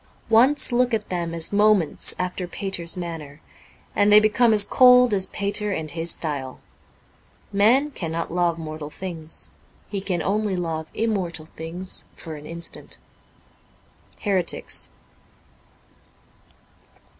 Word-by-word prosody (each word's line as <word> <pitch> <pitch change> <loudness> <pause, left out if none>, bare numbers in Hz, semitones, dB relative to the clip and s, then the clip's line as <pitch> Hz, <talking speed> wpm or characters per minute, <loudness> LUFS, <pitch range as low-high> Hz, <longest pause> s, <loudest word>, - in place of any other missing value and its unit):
Once 255 +7 +4
look 245 -1 +2
at 215 -1 -5
them 175 -2 -3
as 165 +3 -1
moments 205 -6 +3
after 180 0 -3
Pater's 180 -1 -3
manner, 160 -4 -7 0.6
and 205 +1 +3
they 210 - +9
become 215 +2 +3
as 210 -2 +8
cold 250 0 +6
as 190 -1 +2
Pater 205 +1 -1
and 160 -5 -4
his 165 +1 -2
style. 140 -6 -2 0.9
Man 245 +9 +3
cannot 165 - -4
love 175 -1 0
mortal 155 -2 -7
things. 165 -2 -6 0.4
He 200 -2 -3
can 180 -4 -2
only 205 0 0
love 160 -2 -4
immortal 185 -8 -2
things 165 +4 -5
for 160 - -9
an 150 0 -10
instant. 170 0 -7 0.7
' - - -32
Heretics. 190 -5 +1
180 Hz, 120 wpm, -23 LUFS, 165-210 Hz, 0.9 s, they